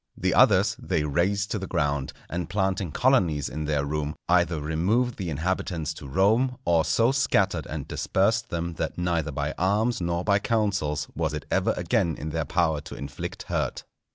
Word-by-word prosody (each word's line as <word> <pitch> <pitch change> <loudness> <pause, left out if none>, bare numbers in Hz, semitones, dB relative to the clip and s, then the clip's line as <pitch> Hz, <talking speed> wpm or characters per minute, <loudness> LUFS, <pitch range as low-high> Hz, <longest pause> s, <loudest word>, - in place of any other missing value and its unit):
The - - +1
others - - +5
they 75 - -1
razed 95 +7 0
to 105 - -1
the 95 - -5
ground, 70 -3 -1 0.2
and 85 0 -4
planting 95 -4 0
colonies 85 - +2
in 75 +4 -4
their 75 -2 0
room, 75 0 -2
either 85 -2 +3
removed 95 +11 0
the 95 -4 -3
inhabitants 80 0 -2
to 75 - -10
Rome, 110 - +2
or 85 -2 +3
so 115 +8 +3
scattered 100 - +1
and - - -5
dispersed 110 +4 +1
them 85 0 -3
that 80 - -2
neither 85 -3 0
by 70 +2 -2
arms 105 +5 +1
nor 85 0 -1
by 100 0 +3
counsels 100 -9 0
was 80 -2 -1
it 75 -2 -6
ever - - +2
again 80 -3 +1
in 80 +1 -5
their - - -1
power 80 -4 +1
to - - -9
inflict 70 - -6
hurt. - - -2
85 Hz, 180 wpm, -26 LUFS, 75-100 Hz, 0.2 s, others